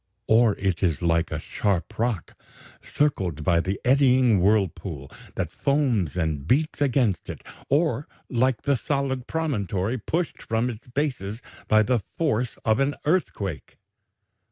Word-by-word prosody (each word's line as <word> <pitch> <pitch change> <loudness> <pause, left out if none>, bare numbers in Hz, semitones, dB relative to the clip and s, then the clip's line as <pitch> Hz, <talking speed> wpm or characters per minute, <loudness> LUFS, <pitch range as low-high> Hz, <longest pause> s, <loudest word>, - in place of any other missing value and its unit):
or 110 -1 +4
it 95 -3 -1
is 85 -3 0
like 85 -1 +2
the - - -4
sharp 100 +2 -2
rock 115 -7 -1 0.5
circled 95 - -1
by 85 -3 +3
the 95 +3 -2
eddying 130 -4 +4
whirlpool 90 -7 0 0.2
that - - -2
foams 125 - 0
and 80 -4 -1
beats 150 - +1
against 125 -8 +1
it, - - -7 0.3
or 150 0 +1 0.2
like 125 -1 +1
the 140 - +2
solid 135 -1 -2
promontory 115 - -1
pushed 165 - -2
from 115 +2 -1
its 115 +1 -11
basis 125 -6 -2 0.3
by 110 0 +5
the 125 +2 +1 0.2
force 125 -7 0
of 110 +2 +3
an 135 +1 +1
earthquake." 110 - -1
115 Hz, 135 wpm, -25 LUFS, 95-135 Hz, 0.5 s, by